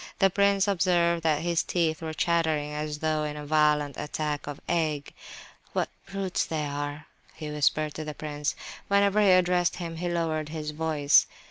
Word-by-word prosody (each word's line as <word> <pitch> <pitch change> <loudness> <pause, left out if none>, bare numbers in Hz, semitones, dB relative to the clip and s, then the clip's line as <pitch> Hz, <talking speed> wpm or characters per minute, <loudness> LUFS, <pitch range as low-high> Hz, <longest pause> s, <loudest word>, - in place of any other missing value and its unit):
The 195 -1 +4
prince 200 0 +3
observed 170 -3 +2
that 155 -1 +1
his 170 -1 +1
teeth 165 -3 0
were 160 -1 -5
chattering 160 -3 +1
as 150 0 -3
though 155 0 0
in 150 0 -4
a 150 - -7
violent 150 -1 +2
attack 150 -1 -3
of 145 -1 -6
ague. 155 -4 -1 0.6
"What - - 0 0.2
brutes 195 -1 -1
they 155 -2 -2
all 145 - -4
are!" 145 +1 -4 0.3
he 155 -2 -6
whispered 150 +1 +1
to 155 - -5
the 150 -1 -6
prince. 150 -1 -3 0.3
Whenever 200 +1 +3
he 205 - +5
addressed 180 -1 +3
him 165 -2 -6
he 175 +1 -2
lowered 160 -3 -1
his 155 -1 -4
voice. 150 -2 +3
155 Hz, 175 wpm, -27 LUFS, 150-175 Hz, 0.6 s, he